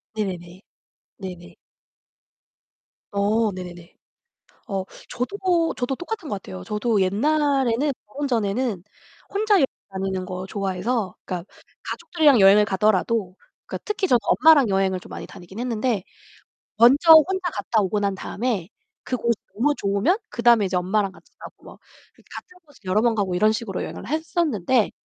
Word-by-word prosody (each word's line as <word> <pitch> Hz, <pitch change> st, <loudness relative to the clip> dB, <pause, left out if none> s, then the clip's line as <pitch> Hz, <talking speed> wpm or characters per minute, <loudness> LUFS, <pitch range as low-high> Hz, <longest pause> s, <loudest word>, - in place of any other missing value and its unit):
네네네. 185 Hz, -3 st, -5 dB, 0.6 s
네네. 180 Hz, -3 st, -9 dB, 1.6 s
어, 210 Hz, +2 st, +1 dB
네네네. 175 Hz, -2 st, -10 dB, 0.7 s
어, 195 Hz, -2 st, -2 dB, 0.2 s
저도 340 Hz, +5 st, 0 dB
저도 250 Hz, +2 st, -2 dB
똑같은 350 Hz, -3 st, -6 dB
것 -, -, -2 dB
같아요. 95 Hz, -, -8 dB
저도 210 Hz, -, 0 dB
옛날에는 275 Hz, +5 st, +1 dB, 0.2 s
결혼 280 Hz, +7 st, -4 dB
전에는 220 Hz, -3 st, -1 dB, 0.5 s
혼자 415 Hz, +1 st, +2 dB
여행 330 Hz, -8 st, +5 dB, 0.3 s
다니는 190 Hz, -1 st, -3 dB
거 185 Hz, 0 st, -6 dB
좋아해서 195 Hz, +1 st, -2 dB
그러니까 180 Hz, -2 st, -4 dB, 0.4 s
가족들이랑 300 Hz, -8 st, +2 dB
여행을 200 Hz, +2 st, +7 dB
가더라도 200 Hz, 0 st, +1 dB, 0.3 s
그러니까 -, -, -5 dB
특히 410 Hz, -2 st, -1 dB
저는 245 Hz, -7 st, +4 dB
엄마랑 300 Hz, -7 st, +5 dB
여행을 190 Hz, -1 st, +1 dB
좀 -, -, -14 dB
많이 -, -, -8 dB
다니긴 190 Hz, +2 st, -11 dB
했는데 235 Hz, -4 st, -1 dB, 0.7 s
먼저 275 Hz, +9 st, +7 dB
혼자 360 Hz, +3 st, +4 dB
갔다 220 Hz, -3 st, 0 dB
오고 205 Hz, +1 st, 0 dB
난 200 Hz, -1 st, 0 dB
다음에 210 Hz, -2 st, -3 dB, 0.4 s
그곳이 235 Hz, -2 st, 0 dB, 0.2 s
너무 275 Hz, +8 st, +2 dB
좋으면 200 Hz, -, +1 dB
그다음에 235 Hz, -3 st, +4 dB
이제 185 Hz, -1 st, -2 dB
엄마랑 190 Hz, +2 st, 0 dB
같이 -, -, -20 dB
가고 -, -, -12 dB
막 -, -, -13 dB, 0.3 s
그러니까 -, -, -17 dB
같은 360 Hz, -, -11 dB
곳을 290 Hz, -3 st, -22 dB
여러 185 Hz, +3 st, +2 dB
번 235 Hz, -1 st, +2 dB
가고 195 Hz, -4 st, -1 dB
이런 215 Hz, +4 st, +3 dB
식으로 210 Hz, -4 st, -4 dB
여행을 -, -, -7 dB
했었는데 285 Hz, -, 0 dB
215 Hz, 340 characters per minute, -23 LUFS, 190-270 Hz, 1.6 s, 여행을